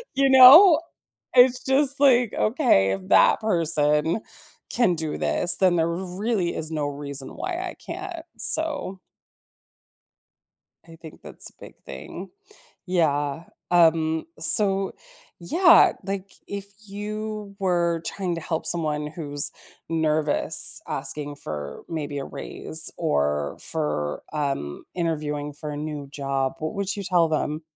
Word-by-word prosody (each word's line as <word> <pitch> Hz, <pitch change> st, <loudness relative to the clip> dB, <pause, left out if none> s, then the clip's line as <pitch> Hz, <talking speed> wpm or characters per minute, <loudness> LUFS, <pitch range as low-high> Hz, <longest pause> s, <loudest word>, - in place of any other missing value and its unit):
you 275 Hz, 0 st, +3 dB
know? 295 Hz, +7 st, +9 dB, 0.6 s
It's 250 Hz, 0 st, +5 dB
just, 275 Hz, +1 st, +2 dB
like, 250 Hz, -5 st, +4 dB
okay, 215 Hz, -, +2 dB
if 95 Hz, -1 st, -5 dB
that -, -, +5 dB
person 160 Hz, -2 st, +1 dB, 0.5 s
can 210 Hz, -8 st, +2 dB
do 155 Hz, -1 st, -4 dB
this 175 Hz, -, +2 dB
then 185 Hz, -2 st, +3 dB
there 165 Hz, 0 st, +2 dB
really 185 Hz, +2 st, -2 dB
is 160 Hz, 0 st, -4 dB
no 150 Hz, -2 st, -2 dB
reason 140 Hz, -1 st, -6 dB
why 370 Hz, -, -4 dB
I 370 Hz, -, -5 dB
can't, 345 Hz, -1 st, -8 dB
so 295 Hz, -12 st, -1 dB, 1.9 s
I 165 Hz, -, -13 dB
think 160 Hz, -2 st, -13 dB
that's -, -, -8 dB
a -, -, -34 dB
big -, -, -12 dB
thing. 65 Hz, -, -9 dB, 0.6 s
Yeah. 150 Hz, -3 st, 0 dB, 0.3 s
Um, 160 Hz, -2 st, +3 dB
so, 195 Hz, +3 st, +2 dB, 0.5 s
yeah, 335 Hz, -, +5 dB
like, 195 Hz, 0 st, -5 dB
if 200 Hz, -1 st, -6 dB, 0.2 s
you 210 Hz, 0 st, -6 dB
were 170 Hz, -3 st, 0 dB
trying 185 Hz, -3 st, -3 dB
to 165 Hz, -, -5 dB
help 160 Hz, 0 st, -4 dB
someone 150 Hz, -3 st, -1 dB
who's 145 Hz, -2 st, -1 dB, 0.4 s
nervous 155 Hz, -2 st, +1 dB
asking 145 Hz, -1 st, -4 dB
for, 75 Hz, -, -7 dB
maybe, 145 Hz, -3 st, -4 dB
a 135 Hz, -, -4 dB
raise, -, -, -3 dB
or 75 Hz, 0 st, -1 dB
for, 75 Hz, 0 st, -3 dB
um, 135 Hz, -, -3 dB
interviewing 150 Hz, -4 st, -3 dB
for 150 Hz, +1 st, -7 dB
a 145 Hz, -, -6 dB
new 150 Hz, -2 st, -6 dB
job, 135 Hz, -1 st, -2 dB
what 155 Hz, 0 st, -4 dB
would 200 Hz, -1 st, -2 dB
you 200 Hz, -, -5 dB
tell 175 Hz, -3 st, +2 dB
them? 155 Hz, 0 st, -2 dB
165 Hz, 130 wpm, -24 LUFS, 145-200 Hz, 1.9 s, know